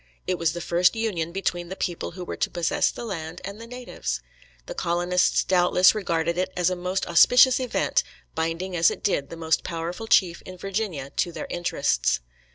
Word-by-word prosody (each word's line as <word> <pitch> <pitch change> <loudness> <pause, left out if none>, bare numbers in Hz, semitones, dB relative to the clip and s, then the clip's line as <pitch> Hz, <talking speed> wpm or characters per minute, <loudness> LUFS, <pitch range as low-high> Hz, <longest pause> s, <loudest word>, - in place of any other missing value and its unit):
It 185 -1 -1
was 165 -1 +1
the 175 - -5
first 175 +5 +2
union 190 -8 -2
between 175 -2 -2
the 190 - -5
people 175 -3 -3
who 180 0 -7
were - - -5
to - - -1
possess 175 -2 +1
the 240 - -7
land 170 -4 -5
and 200 +3 -7
the 230 - -9
natives. 245 - -4 0.5
The - - -6
colonists 175 +1 +1
doubtless 180 0 +4
regarded 170 -4 -1
it 185 0 -1
as 180 0 +2
a - - 0
most 180 +2 -2
auspicious 250 +9 +6
event, 255 -2 +1 0.3
binding 165 +3 -2
as 165 -1 +5
it - - -7
did 140 -8 0
the 165 - -8
most 160 -1 +1
powerful 175 +6 -4
chief 185 -7 +3
in 185 0 -10
Virginia 185 -8 -3
to 175 - +1
their - - -6
interests. 140 - 0
175 Hz, 190 wpm, -25 LUFS, 165-190 Hz, 0.5 s, auspicious